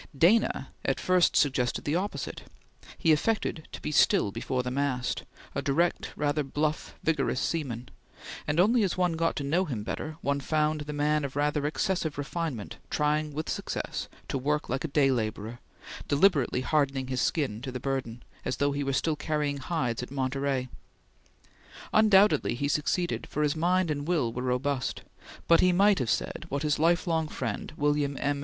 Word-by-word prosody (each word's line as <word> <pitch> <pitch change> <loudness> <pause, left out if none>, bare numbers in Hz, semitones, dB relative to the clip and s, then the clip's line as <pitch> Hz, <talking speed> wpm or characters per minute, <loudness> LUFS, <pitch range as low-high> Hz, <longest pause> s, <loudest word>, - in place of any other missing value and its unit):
Dana 195 +10 +3
at - - 0
first 185 -1 +3
suggested 130 -4 +2
the 145 - 0
opposite; 195 +4 -3 0.6
he 160 - +3
affected 160 0 0
to - - -7
be - - -4
still 105 -7 +4
before 125 +5 -2
the 125 - -3
mast, 130 -2 -1 0.3
a - - -1
direct, 165 +5 0
rather 150 +1 0
bluff, 150 +2 -2
vigorous 140 -5 +1
seaman, 125 -7 -2 0.6
and 150 +3 +1
only 225 +6 +5
as 190 -4 0
one 180 -2 +2
got 165 0 0
to 145 - -3
know 165 +7 +1
him 120 - -4
better 155 +7 -5
one 140 0 0
found 155 +2 0
the 150 0 -5
man 150 +1 +1
of 135 -1 -4
rather 145 0 +1
excessive 160 -1 -1
refinement 145 - -4
trying 150 0 +1
with 155 +2 -4
success - - -3 0.2
to 135 - -2
work 150 +3 -1
like 130 +2 -1
a - - -1
day 140 -2 +3
laborer, 110 -1 -3 0.5
deliberately 145 -5 +3
hardening 135 -2 +1
his 130 -1 -2
skin 130 -9 0
to 130 0 -5
the 125 - -4
burden, 125 -3 -3 0.2
as - - -2
though 145 0 +2
he 140 0 -2
were 135 0 -1
still 155 +3 +1
carrying 150 -1 -1
hides 130 -5 -2
at 125 - -6
Monterey. 135 -1 -1 1.3
Undoubtedly 210 - +5
he 140 +4 -1
succeeded, 155 +4 0
for 150 - -1
his 150 0 +1
mind 175 +1 +2
and 145 0 -3
will 145 -10 +1
were 125 - -3
robust, 130 +1 -1 0.4
but 170 - +6
he 185 - +5
might 200 +1 +4
have 125 -4 -1
said - - -2
what 140 +2 -2
his 150 -1 +1
lifelong 165 -1 +2
friend 115 -8 -4
William 145 -1 +1
M. 145 0 0
145 Hz, 175 wpm, -28 LUFS, 135-160 Hz, 1.3 s, but